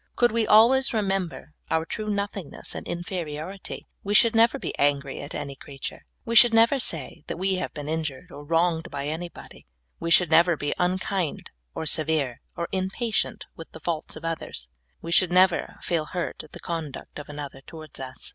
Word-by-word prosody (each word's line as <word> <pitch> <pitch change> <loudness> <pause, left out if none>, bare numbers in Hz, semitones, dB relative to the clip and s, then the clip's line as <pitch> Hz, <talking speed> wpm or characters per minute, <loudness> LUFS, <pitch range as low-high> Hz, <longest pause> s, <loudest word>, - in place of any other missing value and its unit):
Could 240 -1 +4
we 225 -1 +1
always 245 +5 +6
remember 195 -6 -1 0.2
our 160 0 +1
true 215 +5 -4
nothingness 200 -5 -4
and - - -7
inferiority, 175 +1 -5 0.2
we 205 +1 0
should 230 +1 +6
never 230 +4 +5
be - - -5
angry 140 -1 +2
at 140 - -6
any 140 -2 -4
creature, 135 0 -8 0.2
we 230 - -2
should 230 0 +8
never 230 +5 +5
sa}^ 160 - -1
that - - -4
we 190 +1 +1
have 185 - -3
been 145 -1 -5
injured 160 +1 -3
or 145 - -9
wronged 165 +1 +1
by 140 -1 -4
anybody, 165 - -7 0.3
we 170 - -2
should 165 -1 +5
never 170 +1 +5
be 145 0 -1
unkind 185 -1 -1 0.2
or - - -3
severe 155 -5 +2 0.2
or 170 - -2
impatient 195 +5 -1
with 165 - -10
the - - -9
faults 160 -1 -3
of - - -8
others, 160 - -4 0.3
we 165 - -5
should 180 0 +4
never 185 0 +3
feel 165 -3 0
hurt 175 +2 -4
at 155 - -20
the - - -8
con 165 -3 -3
duct 140 - -9
of 150 - -9
another 145 -2 -7
towards 155 +1 -10
us. 130 -1 -4
170 Hz, 185 wpm, -26 LUFS, 150-195 Hz, 0.3 s, should